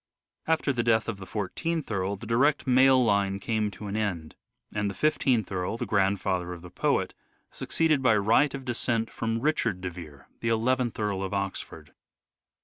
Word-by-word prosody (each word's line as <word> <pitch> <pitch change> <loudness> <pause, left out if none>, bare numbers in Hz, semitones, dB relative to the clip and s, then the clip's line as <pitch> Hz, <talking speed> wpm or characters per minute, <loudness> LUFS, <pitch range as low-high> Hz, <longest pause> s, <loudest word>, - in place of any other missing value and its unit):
After 160 -3 +1
the 120 - 0
death 110 -1 +2
of 115 -4 -3
the 95 -1 -10
I4th 150 - -3
Earl 100 0 -1
the 100 - -10
direct 135 +6 +2
male 130 0 +5
line 100 -2 +1
came 110 0 -1
to 105 +1 -10
an 100 0 -4
end, 90 -8 -2 0.4
and 105 -1 -1
the 100 - -6
i5th 130 -8 +1
Earl, 95 +4 -2
the 120 - -3
grandfather 95 -3 0
of 85 -1 -10
the 90 - -11
poet, - - 0 0.4
succeeded 155 -4 +1
by 120 -5 +4
right 115 +8 +3
of 135 -1 -8
descent 115 -2 0
from 115 0 -2
Richard 120 -9 0
de 90 0 -4
Vere, 80 -5 -11
the 115 - -1
nth 120 +1 +1
Earl 105 -3 -1
of 95 +1 -3
Oxford. 100 -1 -5
110 Hz, 180 wpm, -27 LUFS, 95-125 Hz, 0.4 s, male